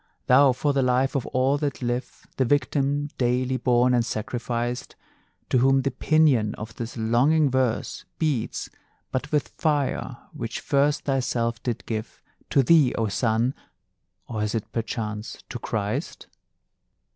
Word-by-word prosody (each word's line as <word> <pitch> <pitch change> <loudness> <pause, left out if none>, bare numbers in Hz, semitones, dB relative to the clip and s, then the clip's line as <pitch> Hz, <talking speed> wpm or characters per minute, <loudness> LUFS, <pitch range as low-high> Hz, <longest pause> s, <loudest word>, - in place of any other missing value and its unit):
Thou, 135 +2 +6
for 145 +3 0
the 140 - +2
life 130 +1 +2
of 135 - -1
all 130 +3 +1
that 140 -3 -3
live 120 +1 -3
The 130 - +3
victim 145 +2 +1
daily 125 +1 +1
born 125 0 +3
and 120 -1 +3
sacrificed; 120 +2 -3 0.6
To 130 - +4
whom 135 +1 +4
the 140 - 0
pinion 130 -6 +3
of 110 +1 -8
this 120 +1 -6
longing 130 +7 +3
verse 130 -3 -1
Beats 150 -8 -1 0.4
but 135 +3 -3
with 150 -2 +1
fire 145 -4 -1 0.2
which - - -4
first 145 +1 +1
thyself 120 -4 -1
did 120 -3 -3
give, 110 -1 -5 0.3
To 135 - +4
thee, 150 -2 +5
O 110 -2 0
Sun 115 +4 +1 0.7
or 110 -3 -3
is 105 0 -1
't 110 - -4
perchance, 110 -1 -4
to 120 - -5
Christ? 105 -2 -3
125 Hz, 145 wpm, -25 LUFS, 115-140 Hz, 0.7 s, Thou